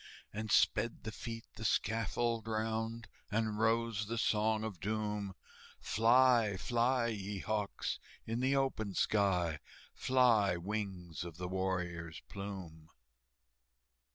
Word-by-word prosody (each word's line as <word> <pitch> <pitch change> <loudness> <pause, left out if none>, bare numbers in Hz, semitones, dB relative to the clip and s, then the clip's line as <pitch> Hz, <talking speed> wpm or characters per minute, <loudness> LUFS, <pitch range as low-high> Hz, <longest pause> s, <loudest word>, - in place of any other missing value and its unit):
And 110 +1 -4
sped 115 +1 +3
the 110 - -4
feet 115 0 -6
the 110 - -6
scaffold 115 +1 0
round, 110 +1 -2 0.2
And 110 0 0
rose 110 -2 +1
the 115 +2 -2
Song 110 -1 +2
of 105 -6 -5
Doom, 105 -1 -2 0.4
"Fly, 115 -2 +4
fly, 120 +3 +2
ye 100 -2 -4
hawks, 105 +1 -2 0.3
in 115 +1 -2
the 130 +2 +2
open 110 -8 0
sky, 90 -7 +2 0.3
Fly, 115 -8 +4
wings 95 -3 -4
of 85 -2 -8
the 90 0 -3
warrior's 90 -4 -2
plume!" 95 -6 -7
110 Hz, 115 wpm, -35 LUFS, 95-115 Hz, 0.4 s, Fly